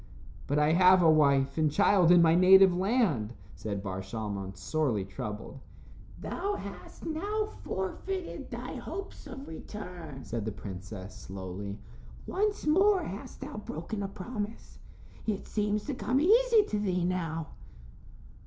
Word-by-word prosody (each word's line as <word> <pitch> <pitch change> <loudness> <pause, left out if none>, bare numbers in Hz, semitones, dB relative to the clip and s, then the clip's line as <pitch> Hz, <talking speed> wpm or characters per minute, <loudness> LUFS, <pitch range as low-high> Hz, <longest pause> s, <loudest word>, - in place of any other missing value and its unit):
"But 145 - +1
I 150 +1 +4
have 185 +1 +6
a 160 - +7
wife 140 -2 +3
and 155 -2 +3
child 190 0 +4
in 175 -1 +7
my 165 -1 +5
native 185 +1 +7
land," 185 - +1 0.2
said 100 -2 -4
Bar 95 -1 -3
Shalmon, 100 -1 -5
sorely 120 -3 0
troubled. 105 +6 -6 0.6
"Thou 405 +1 -2
hast - - -9
now 405 +7 -1 0.2
forfeited 355 - -4
thy - - -6
hopes 395 -5 -7
of 270 0 -8
return," 165 -6 -8
said 115 -2 -3
the 110 - -2
princess, 95 -1 -8
slowly. 95 +2 -6 0.5
"Once 415 +2 -1
more 380 +4 +4
hast 200 - -7
thou - - -6
broken 205 +1 -5
a 200 - -2
promise. 210 +2 -6 0.5
It 210 -3 -1
seems 210 0 -1
to 295 - -2
come 255 +1 0
easy 450 +6 +5
to 210 - 0
thee 180 -4 0
now." 165 -4 -2
180 Hz, 140 wpm, -30 LUFS, -, 0.6 s, a